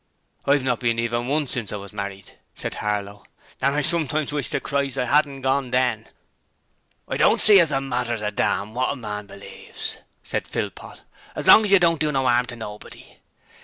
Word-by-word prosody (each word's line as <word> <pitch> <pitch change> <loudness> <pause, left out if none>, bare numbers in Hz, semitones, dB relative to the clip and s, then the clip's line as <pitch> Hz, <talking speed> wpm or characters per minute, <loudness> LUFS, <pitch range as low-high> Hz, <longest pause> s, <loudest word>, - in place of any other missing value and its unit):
'I've 140 -1 +3
not 125 -2 0
been 115 -2 0
even 120 +1 -1
once 145 0 0
since 115 -5 -3
I - - -3
was 100 0 -9
married,' 100 -2 -6 0.2
said - - -4
Harlow, 105 -1 -3 0.4
'and 140 +1 +2
I 150 - +2
sometimes 155 -1 +1
wish 145 -3 -1
to - - -1
Christ 140 -1 -2
I 130 - +1
'adn't 140 0 +1
gorn 135 -1 +1
then.' 125 -4 0 1.0
'I - - -2
don't - - +4
see 210 -2 +7
as 165 -3 +3
it 135 - +1
matters 125 -4 -2
a 105 - -1
dam 105 0 -1
wot 130 +3 0
a - - -7
man 105 -5 -6
believes,' - - -7 0.3
said - - -3
Philpot, - - -6 0.3
'as - - -4
long 220 - +8
as 200 - 0
you 200 - +8
don't 165 -3 +2
do 155 -1 +1
no 135 -2 0
'arm 125 0 +3
to 120 - -7
nobody. 105 -2 -10
125 Hz, 200 wpm, -23 LUFS, 110-145 Hz, 1.0 s, long